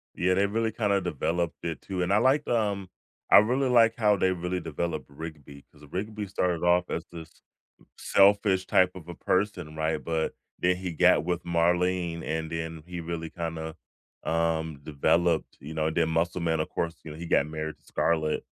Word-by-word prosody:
Yeah, 90 +1 +2
they 100 +2 +3
really 110 +2 0
kinda 100 -3 +1
developed 85 +1 -2
it 85 -2 -4
too, 95 -2 -4
and 90 - 0
I 105 - +5
liked, 135 +5 +3
um 100 -5 0 0.4
I - - +10
really 125 +6 +3
like 115 -2 +5
how 105 -3 +3
they 95 0 +2
really 90 0 -2
developed 80 -2 -3
Rigby 70 -2 -9
because 75 0 -17
Rigby 105 +3 -4
started 90 -3 -1
off 90 0 +3
as 80 - -3
this 80 -2 -9 0.7
selfish 100 -1 +4
type 90 0 +4
of 90 -3 -11
a 85 - -6
person, 95 -5 -1
right? 80 -1 -1
But 80 +2 -1 0.3
then 90 0 +3
he 90 -2 -4
got 75 -1 +4
with 90 0 -1
Marlene, 85 0 +1
and 80 +1 -3
then 80 -1 -5
he 90 -1 -6
really 80 -1 -5
kinda, 80 -1 -5 0.5
um, 80 -2 0
developed, 80 +3 +1
you 75 +4 -8
know 80 0 0
and 80 - -5
then 80 -1 +3
Muscle 85 +2 0
Man, 80 -1 0
of 80 - -1
course, 85 0 -2
you 80 - -8
know, 75 - -8
he 85 +1 -7
got 75 - +3
married 80 0 -5
to - - -36
Scarlett 80 -2 0
85 Hz, 190 wpm, -27 LUFS, 80-95 Hz, 0.7 s, I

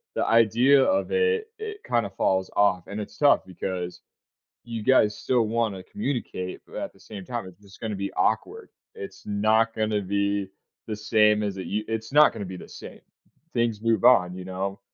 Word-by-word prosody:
the - - 0
idea 120 +5 +5
of 285 0 +1
it 455 -1 +1
it 430 -1 -6
kinda 115 -4 0
falls 95 -1 0
off, 95 -4 +2
and 105 +1 -5
it's 105 - -7
tough 145 -1 +4
because 90 -1 -5 0.6
you 115 -2 -5
guys 105 -5 +4
still 125 -2 +1
wanna 110 -4 -1
communicate, 125 - -4
but - - -14
at - - -5
the - - -23
same 100 -3 -9
time, 120 -6 -4
it's 95 +1 -14
just 100 -1 -17
gonna 110 -2 -3
be 100 0 -4
awkward. 430 - -1 0.3
It's 420 -3 -9
not 110 +2 +2
gonna 110 -1 0
be 100 0 -1 0.4
the 110 - -3
same 105 0 +3
as 100 -2 -3
it 95 - -5
u 105 +2 -2
it's 110 +3 -4
not 150 +1 +7
gonna 100 - -5
be 95 0 -7
the - - -11
same. - - -11 0.5
Things 115 -3 0
move 115 +1 +1
on, 90 -8 +5
you 90 -1 -8
know? 95 +1 -4
105 Hz, 190 wpm, -25 LUFS, 100-120 Hz, 0.6 s, not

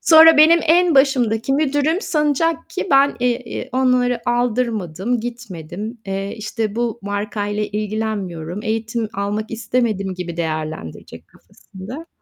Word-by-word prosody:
Sonra 320 0 +8
benim 320 +3 +7
en 340 +1 +4
başımdaki 260 -3 +2
müdürüm 290 +4 +1
sanacak 315 - 0
ki - - -3
ben, 275 +1 +4
eee, 245 0 0
eee, 250 - -6
onlara 250 -2 +2
aldırmadım, 235 -4 -1
gitmedim, 220 -2 -7
eee, 195 +1 -3
işte 220 -1 -3
bu 235 -1 -1
markayla 205 +1 -3
ilgilenmiyorum, 205 -5 -3
eğitim 225 0 -2
almak 205 +2 -3
istemedim 220 -4 -1
gibi 175 -2 -6
değerlendirecek 155 - -5
kafasında. 235 - -11
225 Hz, 120 wpm, -20 LUFS, 200-265 Hz, -, Sonra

